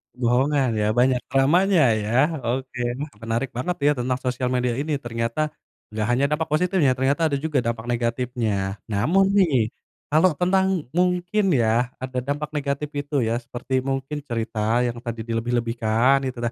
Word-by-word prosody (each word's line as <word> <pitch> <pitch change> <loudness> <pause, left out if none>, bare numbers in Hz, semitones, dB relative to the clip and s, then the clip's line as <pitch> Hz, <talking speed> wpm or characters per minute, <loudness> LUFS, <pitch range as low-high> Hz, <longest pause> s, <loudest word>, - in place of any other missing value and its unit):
Bohongan 130 +2 +2
ya, 105 - +1
banyak 125 +1 +3
dramanya 155 - +4
ya. 110 0 -1 0.3
Oke, 130 +1 -3 0.2
wah 145 0 -5
menarik 115 +3 -2
banget 130 +9 -2
ya 145 - +5
tentang 125 +1 0
sosial 125 0 -1
media 125 -1 0
ini, 150 0 -1
ternyata 120 +4 -2 0.4
gak 110 +1 -2
hanya 130 +3 +2
dampak 160 +1 0
positif 180 +4 +1
ya, 130 -4 +3
ternyata 140 +5 +1
ada 140 - -1
juga 150 -2 0
dampak 115 -2 -2
negatifnya. 115 -4 -2
Namun 180 - +2
nih, 140 - +3 0.4
kalau 160 +4 +4
tentang 190 -3 +1
mungkin 180 +2 +1
ya 120 -1 +2
ada 130 0 -3
dampak 145 +2 -2
negatif 140 0 -2
itu 145 -4 -1
ya, 115 - 0
seperti 130 +2 -3
mungkin 135 +2 -3
cerita 115 -2 -1
yang 120 - -3
tadi 115 -2 -5
dilebih-lebihkan 120 +2 +1
gitulah. 120 -1 -3
130 Hz, 155 wpm, -23 LUFS, 115-150 Hz, 0.4 s, ya